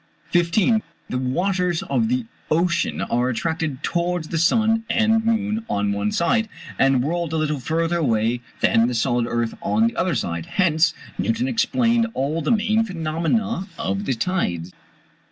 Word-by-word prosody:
] - - -32
15. 185 +6 +3 0.3
The 125 - -1
waters 180 +6 0
of 225 +4 0
the 255 -1 0 0.2
ocean 170 +2 +1
are 120 +2 0
attracted 150 +3 -2
towards 175 -2 -1
the 165 - -1
sun 225 +6 +3
and 225 0 +3
moon 220 -1 0
on 100 0 0
one 100 +1 -1
side, 225 - +1 0.3
and 135 -2 +4
whirled 165 +2 -2
a - - +1
little 150 -2 0
further 165 +6 0
away 120 -4 +1 0.2
than 115 +1 +4
the 125 - -2
solid 120 0 +1
earth 120 -1 -1
on 215 +6 +2
the 230 - 0
other 185 -3 0
side: 85 -1 -3
hence 165 -3 +3 0.2
Newton 230 +3 0
explained 235 -1 +2
all 150 +5 -1
the 155 - -2
main 220 0 +2
phenomena 185 +4 -1
of 100 +1 -2
the 130 - 0
tides. 90 - -2
170 Hz, 160 wpm, -22 LUFS, -, 0.3 s, and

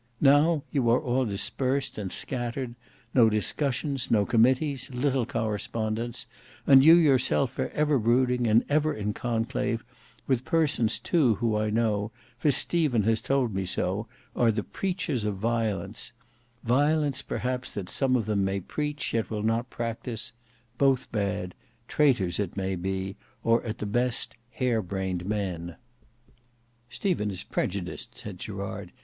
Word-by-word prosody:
Now 145 +2 +4
you 130 -5 +1
are 120 - +5
all 130 -2 0
dispersed 120 +6 -1
and 95 -3 -4
scattered: 120 0 -3 0.4
no 115 -4 +6
discussions, 135 +5 0
no 105 -3 +3
committees, 130 +5 +2
little 130 -1 0
correspondence—and 115 +4 0
you 160 +3 +9
yourself 135 -4 +3
are - - 0
ever 150 -2 +2
brooding 125 +1 +2
and 110 +2 +4
ever 155 +1 +1
in 105 0 -2
conclave, 115 +1 -2 0.4
with 130 -2 +1
persons 150 -8 +1
too 140 -11 +2
who 115 0 0
I 105 0 0
know, 105 -2 +1 0.3
for 150 - +2
Stephen 140 -4 +2
has 110 +1 +2
told 130 -5 +1
me 95 0 -1
so, 95 +4 -2 0.3
are 120 -2 +4
the 105 -1 -2
preachers 180 - -2
of 105 -1 -1
violence: 110 -1 -2 0.5
violence 145 +3 +2
perhaps 125 0 -3
that 95 -3 -4
some 130 +5 +1
of 115 -4 +1
them 105 -2 +1
may 95 +1 0
preach, 150 +9 -3
yet 115 -1 0
will 105 -2 -3
not 115 +3 0
practise: 115 -1 -4 0.5
both 135 -2 +2
bad; 100 -4 -2 0.3
traitors 120 - +2
it 100 -1 -3
may 95 0 -1
be, 95 +2 -3 0.3
or, 115 +1 +3
at 110 0 -4
the 105 - -4
best, 120 +3 0 0.2
hare 125 -2 0
brained 95 -1 -3
men." 90 -5 -3 1.1
"Stephen 165 - -1
is 95 -3 -3
prejudiced," 90 -1 -3
said - - -7
Gerard. - - -6
115 Hz, 145 wpm, -27 LUFS, 105-135 Hz, 1.1 s, you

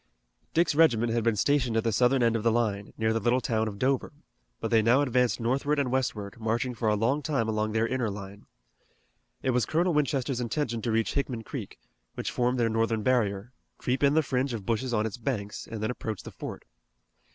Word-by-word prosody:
Dick's 170 0 +3
regiment 120 -7 +4
had 115 -1 +1
been 115 -1 +2
stationed 125 0 +1
at 110 - +1
the 115 - +1
southern 125 +4 +3
end 115 -1 +3
of 115 - 0
the 115 +1 +3
line, 105 -4 -1
near 110 0 +1
the 115 - +1
little 120 +3 +2
town 110 -3 0
of 100 -2 -5
Dover, 130 +4 0 0.5
but - - -3
they 115 -1 +5
now 120 +5 +4
advanced 125 -3 +1
northward 135 +5 0
and 135 -3 0
westward, 115 -5 -2
marching 115 +3 -1
for 115 -2 0
a 105 - +3
long 125 +8 +1
time 135 -6 0
along 110 0 0
their 110 +1 +1
inner 125 -2 -1
line. 100 0 -8 1.0
It 130 - +2
was 125 -1 +1
Colonel 170 +2 +1
Winchester's 135 -4 0
intention 120 -1 -2
to 115 - -1
reach 110 0 +1
Hickman 130 -5 -2
Creek, - - -7 0.4
which - - -3
formed 125 +1 0
their 115 - +3
northern 115 -1 0
barrier, 115 -2 0 0.2
creep 130 +1 -1
in 140 +1 +4
the 160 - +4
fringe 130 -2 -1
of 105 -4 -7
bushes 120 +4 -1
on 110 -2 +1
its 110 0 -4
banks, 110 -4 -4
and 110 -2 -5
then 110 - 0
approach 110 -4 -5
the - - -8
fort. - - -8
120 Hz, 215 wpm, -28 LUFS, 110-130 Hz, 1.0 s, they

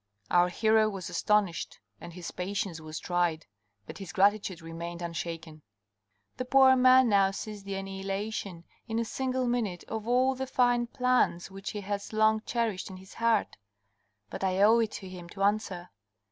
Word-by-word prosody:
Our 175 0 +5
hero 220 +2 +3
was 195 -4 -6
astonished, 210 -5 0 0.2
and 170 - -9
his 175 0 -7
patience 190 -2 -3
was 155 0 -7
tried, 175 -3 -1 0.4
but - - -9
his 190 -5 -7
gratitude 200 -2 +2
remained 170 +1 -7
unshaken. 165 -2 -5 0.8
"The 255 - -3
poor 265 0 +6
man 255 0 +6
now 200 -3 +4
sees 205 +1 -7
the 200 0 -4
annihilation, 195 -1 -4 0.2
in 225 -1 -2
a 230 - 0
single 260 +2 -2
minute, 220 -8 -1
of 220 0 -5
all 255 +2 +3
the 265 0 -4
fine 245 -2 +2
plans 250 -8 +1
which 195 +1 -6
he 210 - -5
has 200 +1 -4
long 220 0 +3
cherished 225 -5 -1
in 190 - -9
his 190 +1 -14
heart. 230 -2 +1 0.7
But - - -6
I 190 0 +1
owe 225 +3 +6
it 225 -2 0
to 195 - -7
him 180 -2 -10
to 195 +2 -4
answer. 200 -4 -1
200 Hz, 170 wpm, -29 LUFS, 180-230 Hz, 0.8 s, poor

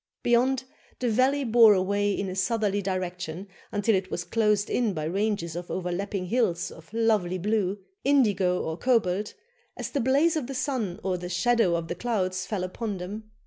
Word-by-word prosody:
Beyond, 245 +2 +3 0.3
the 245 -2 0
valley 265 +5 +2
bore 225 -3 +7
away 200 +2 +1
in 195 0 -2
a 185 - -4
southerly 205 0 0
direction 185 -1 -4 0.2
until 205 +2 +1
it 185 -1 0
was 175 - -3
closed 210 0 +1
in 230 -5 0
by 155 - -3
ranges 185 -1 -1
of 175 0 -6
overlapping 185 +1 -3
hills 185 -4 0
of 165 +2 -14
lovely 215 -5 +1
blue 200 0 0 0.3
indigo 200 -10 +3
or 160 0 -3
cobalt 210 -5 +1 0.4
as - - -5
the 285 - 0
blaze 280 +7 +3
of 295 -6 -2
the 275 - -5
sun 235 -9 -2
or 185 -2 -1
the 180 0 -6
shadow 185 0 +2
of 165 -1 -3
the - - -2
clouds 185 -2 -2
fell 200 -4 -2
upon 200 +3 -4
them. 205 +4 -7
205 Hz, 180 wpm, -27 LUFS, 180-230 Hz, 0.4 s, bore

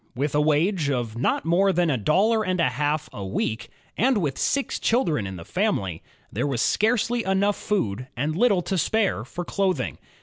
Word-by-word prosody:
With 140 +3 -1
a 150 - +3
wage 155 +2 +2
of 120 -5 -2
not 120 +4 0
more 185 +4 +3
than 175 -3 +1
a - - +1
dollar 205 - +2
and 185 -2 -1
a 165 - +3
half 150 +5 -1
a 100 - -6
week, 110 +4 -3 0.3
and 255 +1 +2
with 150 -9 -1
six 280 -1 -1
children 165 - +1
in 95 - -6
the 85 -2 -9
family, 100 - -1 0.3
there 145 - -1
was 135 -4 -2
scarcely 230 - +1
enough 195 +2 +1
for - - -13
food 125 - -1
and 145 +5 -1
Uttle 195 -1 +2
to 190 -2 0
spare 200 - +1
for 175 +8 -6
clothing. 190 0 -1
165 Hz, 195 wpm, -24 LUFS, 130-200 Hz, 0.3 s, a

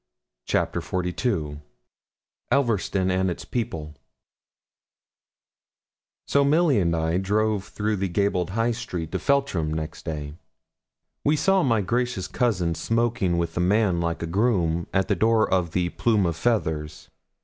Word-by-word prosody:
CHAPTER - - 0
XLII 90 - -2 0.9
ELVERSTON 100 -7 +1
AND 95 0 +1
ITS 85 - -5
PEOPLE 80 -11 -4 2.3
So 140 - +3
Milly 150 -3 +3
and 85 -3 +1
I 80 +2 0
drove 105 0 0
through 105 +1 -2
the 95 +1 -1
gabled 90 -1 0
high 115 +1 +2
street 90 -9 -5
of - - -2
Feltram 140 - +1
next 80 0 -5
day. 75 -2 -4 0.9
We 150 - +3
saw 190 +5 +3
my 115 -8 +2
gracious 120 -1 -1
cousin 90 -9 0
smoking 115 -3 0
with 85 -1 -2
a - - -1
man 95 0 +2
like 85 0 -2
a - - 0
groom, 85 -3 +1
at 95 -1 +1
the - - +2
door 110 +3 +3
of 90 -2 +1
the 90 +1 0
'Plume 105 0 +1
of 85 -2 0
Feathers.' 80 -8 -2
95 Hz, 140 wpm, -25 LUFS, 85-115 Hz, 2.3 s, So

